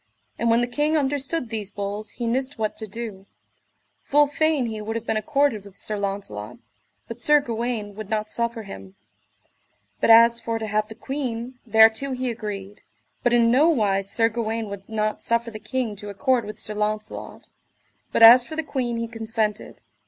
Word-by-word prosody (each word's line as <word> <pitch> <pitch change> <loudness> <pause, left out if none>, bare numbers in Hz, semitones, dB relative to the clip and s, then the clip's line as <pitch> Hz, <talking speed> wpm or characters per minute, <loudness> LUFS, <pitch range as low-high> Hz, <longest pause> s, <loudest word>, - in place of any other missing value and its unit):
And 235 - +1
when 230 +1 +4
the - - +2
king 295 +6 +1
understood 280 -1 -1
these 215 -3 -4
bulls 205 +1 -5
he 240 - -4
nist 260 +4 -1
what 215 -1 -2
to 220 - -4
do: 205 -2 -7 0.7
full 295 +1 +4
fain 295 -2 +1
he 220 -2 -4
would 220 +1 -4
have 230 0 -4
been 220 - -1
accorded 275 -2 +1
with 200 -1 -15
Sir 215 - -4
Launcelot, 195 - -5 0.5
but 230 +1 -8
Sir 295 +4 +5
Gawaine 230 -5 -3
would 215 0 -8
not 215 -1 -2
suffer 235 -1 -2
him; 95 - -10 1.0
but - - +1
as 230 +1 +7
for 230 -1 -2
to 220 - -4
have 215 0 0
the 220 - -10
queen, 250 -1 -4
thereto 220 +5 +5
he 255 -1 -2
agreed. 205 -3 -7 0.4
But 245 - +2
in 235 -1 +4
nowise 220 -9 +3
Sir 225 +3 +2
Gawaine 225 -1 -3
would 200 0 -9
not 215 -1 -1
suffer 235 0 0
the 215 - -8
king 225 0 -3
to 205 +1 -7
accord 245 +3 +1
with 210 0 -8
Sir 215 - -2
Launcelot; 210 +1 -4 0.6
but - - +3
as 240 +2 +10
for 315 - -8
the 320 - -2
queen 255 -5 -2
he 230 0 -2
consented. 225 -2 -3
225 Hz, 180 wpm, -24 LUFS, 210-245 Hz, 1.0 s, as